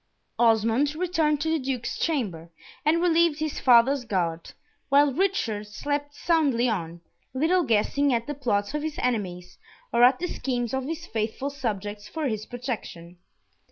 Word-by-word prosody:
Osmond 230 +5 +3
returned 320 -4 +1
to 320 - 0
the 320 - +1
Duke's 260 -3 -3
chamber, 200 - -2 0.3
and 330 +3 +2
relieved 335 -3 +3
his 310 -1 -3
father's 250 +2 +5
guard, 170 -6 -2 0.4
while 280 0 +4
Richard 255 - -1
slept 290 +6 -3
soundly 285 -9 +2
on, 170 -6 -3 0.3
little 330 +7 +3
guessing 275 +2 +1
at 235 -1 0
the 295 - -4
plots 225 -6 -1
of 300 - -1
his 310 0 -4
enemies, 185 -7 -3 0.3
or 235 +1 +4
at 250 +1 +6
the 355 - -3
schemes 245 -8 -3
of 265 -1 -1
his 325 +3 -5
faithful 225 +4 -3
subjects 210 -6 -4
for 315 -3 -3
his 215 -3 -3
protection. 210 -9 -6
255 Hz, 155 wpm, -26 LUFS, 215-300 Hz, 0.4 s, at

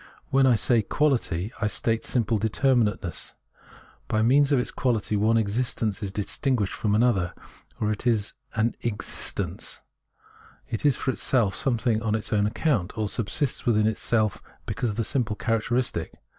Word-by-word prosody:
When 135 0 +5
I 125 - +5
say 115 +1 +3
Quality, 115 - 0
I 105 - +2
state 115 +1 -1
simple 115 -3 0
determinateness; 110 - 0 0.7
by 110 0 +1
means 140 +4 +4
of 140 - +4
its 125 - 0
quality 115 -4 0
one 110 +3 +3
existence 110 -1 -1
is 100 -2 -3
distinguished 105 +2 -1
from 105 -1 0
another 105 -7 +2 0.4
or 105 0 +1
is 110 -4 +1 0.2
an 110 +2 +1
" - - -37
exist 105 -4 -1
ence - - -3 0.4
"; - - -26
it 115 +6 +1
is 140 - +4
for 130 - -1
itself, 115 -7 +1
something 120 -6 0
on 110 -1 0
its 110 0 -3
own 105 -1 +3
account, 110 - 0
or 110 -1 0
subsists 115 +7 -2
with 115 -3 +4
itself 110 -1 +1 0.2
because 120 - -2
of 105 - -3
this 115 -1 -1
simple 120 -5 0
character 115 +2 0
istic. 125 -1 -1
110 Hz, 165 wpm, -26 LUFS, 105-125 Hz, 0.7 s, When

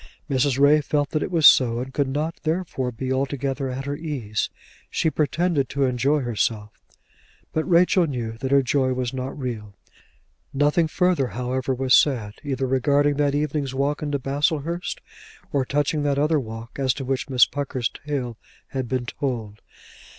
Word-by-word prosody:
Mrs. 135 -2 +1
Ray 145 +2 +6
felt 145 0 -1
that 155 - 0
it - - -2
was 165 -4 +2
so, 120 -5 +7
and 130 +2 -5
could 145 -3 +1
not 150 +5 -2
therefore 160 -6 -2
be 130 +3 -3
altogether 135 0 -2
at 130 +2 -4
her 140 0 -2
ease. 140 -10 -3 0.4
She 160 - 0
pretended 155 -2 0
to 140 - 0
enjoy 135 +3 +2
herself; 110 -3 -1 0.8
but 160 +3 -1
Rachel 175 0 +4
knew 120 -5 -3
that 130 - -2
her 140 0 +4
joy 130 0 +1
was 125 -1 -2
not 130 +2 -4
real. 110 -7 -5 0.8
Nothing 150 +4 +3
further, 180 -4 +1
however, 130 +2 -2
was 130 0 +1
said, 115 -8 +3
either 135 -2 -2
regarding 140 +2 +2
that 145 -1 +2
evening's 145 -2 -1
walk 140 +2 0
into 145 -1 -1
Baslehurst, 150 +5 -1 0.5
or 135 -2 +1
touching 145 +2 0
that 145 -1 +1
other 150 +2 +2
walk 115 0 -8
as 130 -2 +1
to 135 - -5
which 135 +1 -2
Miss 125 -2 +6
Pucker's 135 -4 -2 0.2
tale 130 -6 -3 0.3
had 130 -2 -3
been 130 -2 -1
told. 115 -5 -4
135 Hz, 165 wpm, -23 LUFS, 125-145 Hz, 0.8 s, so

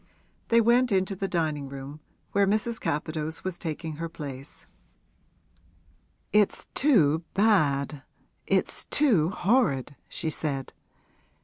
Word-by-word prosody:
They 230 0 +5
went 240 +2 +4
into 190 0 +1
the 195 +1 -2
dining 155 -6 -1
room, 140 +2 -8 0.3
where 200 0 +3
Mrs. 220 +3 0
Capadose 155 +1 -2
was 185 -2 -4
taking 160 -1 -5
her 165 +1 -4
place. 140 -3 -8 1.7
'It's 210 -1 +3
too 170 - +3
bad, 150 -9 +2 0.5
it's - - 0
too 215 - +3
horrid!' 190 - +1
she 160 - -3
said. 140 -3 -3
165 Hz, 110 wpm, -27 LUFS, 150-210 Hz, 1.7 s, They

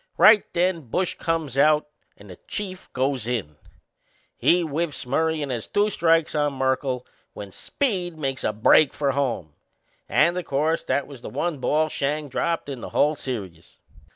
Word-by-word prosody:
Right 215 -1 +6
then 170 -6 0
Bush 180 +8 0
comes 160 -5 -2
out 150 +1 +4 0.3
and 100 -2 -13
the 90 - -11
Chief 185 -3 -6
goes 130 -3 -1
in. 100 -12 -3 0.8
He 175 +1 +3
whiffs 155 -2 -3
Murray 160 +4 0
and 140 - -4
has 120 -3 -4
two 205 +1 +1
strikes 165 -3 +2
on 145 -1 +1
Merkle 130 -1 -1 0.3
when 100 -1 -8
Speed 180 - -2
makes 135 -3 -3
a - - +1
break 110 +7 +4
for 140 -2 +1
home 125 - -2 0.6
and, 175 - +3
o' 180 - -1
course, 155 +1 0
that 140 - 0
was 140 -4 -12
the - - -7
one 170 -5 -2
ball 155 +4 +2
Schang 150 0 -2
dropped 165 +5 -1
in 135 -4 -6
the - - -6
whole 150 +2 +2
serious! 95 - -7
145 Hz, 170 wpm, -24 LUFS, 130-165 Hz, 0.8 s, Right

